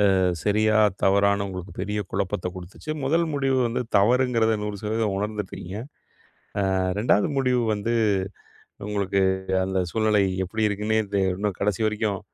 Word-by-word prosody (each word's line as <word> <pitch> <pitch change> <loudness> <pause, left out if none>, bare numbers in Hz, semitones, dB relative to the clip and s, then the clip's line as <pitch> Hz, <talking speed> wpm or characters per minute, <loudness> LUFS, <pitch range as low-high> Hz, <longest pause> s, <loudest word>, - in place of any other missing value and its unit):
அ - - +2 0.3
சரியா? 110 +1 +3 0.3
தவறான்னு 100 +1 +3
உங்களுக்கு 90 0 -7
பெரிய 105 +1 -2
குழப்பத்தை 90 -2 -2
கொடுத்துச்சு. 95 - -8
1 165 +5 +2
முடிவு 135 -2 +1
வந்து 120 +2 -2
தவறுங்கிறது, 115 0 +3
100% 105 0 -2
உணர்ந்துட்டீங்க. 105 -2 -4 1.0
அ - - +1 0.2
2ஆவது 105 +2 +2
முடிவு 125 -2 +2
வந்து, 115 +3 -2 0.9
உங்களுக்கு 100 -1 0 0.4
அந்த 95 0 -1
சூழ்நிலை 110 -2 +2 0.2
எப்படி 110 +5 -4
இருக்குனே 105 +2 0
தெ 100 - +2
இன்னும் 100 -1 -2
கடைசி 105 +1 0
வரைக்கும், 105 -2 -1
105 Hz, 125 wpm, -24 LUFS, 100-110 Hz, 1.0 s, சரியா